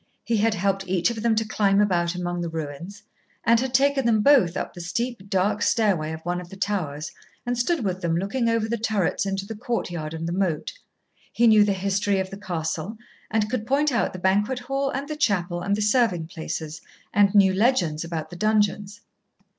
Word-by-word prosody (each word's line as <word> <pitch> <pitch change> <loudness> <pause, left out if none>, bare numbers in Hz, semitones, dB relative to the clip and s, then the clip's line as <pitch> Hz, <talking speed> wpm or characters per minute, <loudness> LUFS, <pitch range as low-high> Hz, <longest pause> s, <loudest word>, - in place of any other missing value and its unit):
He 230 -1 0
had 220 +1 +2
helped 195 0 -1
each 180 +3 +1
of 225 -2 -5
them 230 -1 +2
to 220 +1 0
climb 205 -2 +2
about 175 -4 +1
among 175 -1 -3
the 170 - -3
ruins, 160 +4 -7 0.4
and 230 +1 +4
had 260 +1 -2
taken 275 +1 +3
them 220 -2 +3
both 230 - +4
up - - -4
the 175 - -8
steep, 200 +3 -4
dark 200 +2 +1
stairway 190 -9 +1
of 160 0 -6
one 175 0 -1
of 175 - -12
the 195 - -10
towers, 180 -6 -3 0.3
and 245 0 -1
stood 250 +2 0
with 185 -1 -2
them 170 -2 0
looking 230 +6 0
over 230 -1 +1
the 235 0 -2
turrets 210 -3 0
into 195 0 -2
the 225 - -6
courtyard 175 -9 -4
and 165 +1 -4
the - - -2
moat. 180 -5 -1 0.6
He 235 - +2
knew 215 -2 +7
the 205 -1 +1
history 195 +1 0
of 190 0 -3
the 195 - -7
castle 175 +1 -4 0.3
and 215 -1 +1
could 225 -1 -3
point 285 +3 +2
out 235 - +1
the - - -7
banquet 200 +7 +1
hall 270 +2 -2
and 270 +2 -4
the 305 - -4
chapel 180 - 0
and 200 +2 0
the 210 - -3
serving 210 -7 +2
places, 160 -1 -6 0.3
and 205 0 +4
knew 195 -2 +6
legends 185 -8 +1
about 165 -1 -5
the - - -8
dungeons. 205 0 0
200 Hz, 210 wpm, -24 LUFS, 175-225 Hz, 0.6 s, knew